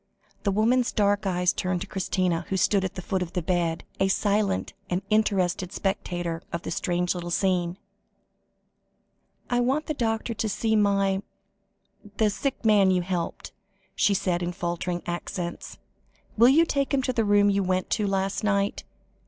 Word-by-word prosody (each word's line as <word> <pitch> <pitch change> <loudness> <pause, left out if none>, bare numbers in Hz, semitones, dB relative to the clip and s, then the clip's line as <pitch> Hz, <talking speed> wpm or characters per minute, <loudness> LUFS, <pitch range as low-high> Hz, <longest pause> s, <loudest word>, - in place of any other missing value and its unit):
The 200 - 0
woman's 235 +5 +2
dark 205 -2 +1
eyes 180 -1 +2
turned 180 -1 -2
to - - -3
Christina, 180 -3 -1
who 190 - 0
stood 195 +1 +2
at 190 - -3
the 185 - -6
foot 190 +1 -1
of 180 0 -4
the 180 - -1
bed, 170 -2 0 0.2
a 195 - +3
silent 200 0 0 0.2
and 180 +2 -1
interested 190 -4 +1
spectator 175 -4 -2
of 170 - -4
the - - -5
strange 175 0 0
little 175 -1 -5
scene. 180 -1 0 1.7
"I 245 - +1
want 265 +5 +1
the 310 - -2
doctor 230 -3 -1
to 220 0 -2
see 220 +2 0
my 195 -2 +2 1.0
the 215 -2 +3
sick 265 +3 -3
man 205 -3 +5
you 180 -1 +2
helped," 175 -2 -4 0.4
she 200 - +3
said 180 -2 0
in 175 0 -2
faltering 175 +1 -3
accents. 175 0 -5 0.6
"Will 235 +3 +6
you 320 +5 +5
take 280 -3 0
him 265 - 0
to 255 - 0
the 230 - +1
room 205 -1 +4
you 200 0 +1
went 185 -1 -1
to 210 - +1
last 195 +1 -1
night? 200 -1 0
195 Hz, 170 wpm, -26 LUFS, 180-215 Hz, 1.7 s, Will